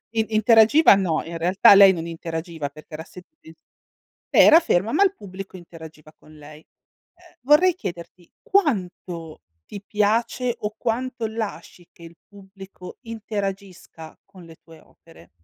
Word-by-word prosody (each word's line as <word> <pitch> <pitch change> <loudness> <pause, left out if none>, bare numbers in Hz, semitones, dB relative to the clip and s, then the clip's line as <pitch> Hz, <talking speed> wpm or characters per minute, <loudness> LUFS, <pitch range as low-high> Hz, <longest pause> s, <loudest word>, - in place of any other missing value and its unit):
i 220 -1 -2
interagiva 225 +6 +5
no, 180 -5 -1
in 165 +1 -8
realtà 185 +4 +5
lei 195 -1 +7
non 165 -2 -5
interagiva 165 -2 -6
perché 155 +2 -17
era 160 +1 -7
se 180 +1 -14 0.2
lei 160 0 -17 0.7
era 320 +2 +6
ferma, 220 - -1
ma 390 +6 +3
il 390 -1 +1
pubblico 195 -1 -11
interagiva 160 -3 -14
con 155 - -20
lei. 150 +1 -14
Eh, 350 - -28
vorrei 320 +6 +4
chiederti 175 - -9
quanto 180 - -3 0.2
ti 200 - -10
piace 230 +4 -1
o 210 +1 -5
quanto 245 0 -4
lasci 215 -5 -8
che 170 - -19
il 165 0 -13
pubblico 195 -2 -14
interagisca 200 -7 -8
con 190 -2 -17
le 165 -1 -16
tue 165 -1 -18
opere? 85 - -22
190 Hz, 145 wpm, -22 LUFS, 165-225 Hz, 0.7 s, lei